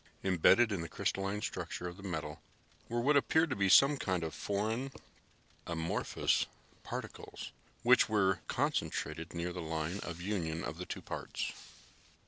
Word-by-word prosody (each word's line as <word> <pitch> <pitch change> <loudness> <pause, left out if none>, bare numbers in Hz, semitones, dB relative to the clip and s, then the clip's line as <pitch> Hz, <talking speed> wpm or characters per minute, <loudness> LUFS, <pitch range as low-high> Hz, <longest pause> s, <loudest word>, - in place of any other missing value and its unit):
Embedded 95 +5 +5
in 95 -4 -1
the 85 - -5
crystalline 95 +2 -1
structure 90 - -3
of 85 - -6
the 100 - -12
metal 95 -3 -4 0.5
were 120 +1 0
what 145 +4 +4
appeared 160 +2 +3
to - - +1
be 100 -2 +2
some 140 +9 +7
kind 95 -8 -1
of 80 - -3
foreign, 110 +6 -1 0.8
amorphous 85 0 0 0.3
particles - - -7 0.3
which 125 0 +6
were 95 -3 +3
concentrated 80 +1 -1
near 85 +1 -2
the 90 - -4
line 80 +3 -2
of 85 -3 -6
union 85 -4 -2
of - - -5
the - - -5
two - - -5
parts. - - -4
95 Hz, 150 wpm, -33 LUFS, 85-110 Hz, 0.8 s, some